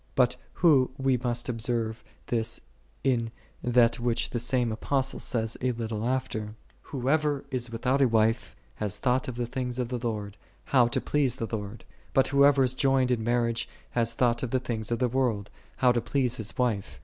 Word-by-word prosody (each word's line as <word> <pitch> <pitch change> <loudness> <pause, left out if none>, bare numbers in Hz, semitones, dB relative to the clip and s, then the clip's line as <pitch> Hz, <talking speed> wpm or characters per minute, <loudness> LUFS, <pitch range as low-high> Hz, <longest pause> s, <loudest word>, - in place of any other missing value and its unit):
But - - +3 0.2
who 145 -7 +4
but 135 -3 +1
must 120 -1 -1
observe 115 -1 -2 0.2
this 115 0 -1 0.4
in 120 -4 +1 0.3
that 120 -1 +3
which 120 -1 0
the 120 - -1
same 120 -1 +1
Apostle 135 +4 -1
says 115 -3 -1
a 130 0 +1
little 115 -1 -3
after, 110 -4 -2 0.3
"Whoso 145 +2 0
is 125 -2 -1
without 125 +4 0
a 135 - +6
wife 110 - +1 0.2
has 105 -3 -2
thought 130 0 +1
of 125 - -4
the 120 0 -2
things 125 0 -3
of 125 -2 -2
the 125 -1 -2
Lord, 105 -4 -4 0.3
how 125 -3 +4
to 120 - -1
please 140 -5 +1
the 115 0 -3
Lord: 105 +1 -7 0.3
but 135 - +4
whoso 140 0 +5
is 130 -1 +2
joined 135 -1 +2
in 115 -3 0
marriage 115 0 0 0.2
has 115 -1 0
thought 120 0 +2
of 130 - -2
the 130 - +1
things 110 -4 -3
of 120 - 0
the 125 - +2
world, 120 -5 0 0.2
how 125 -1 +4
to 120 -1 +1
please 125 0 0
his 110 0 -4
wife. 115 -6 -1
120 Hz, 185 wpm, -28 LUFS, 115-130 Hz, 0.4 s, a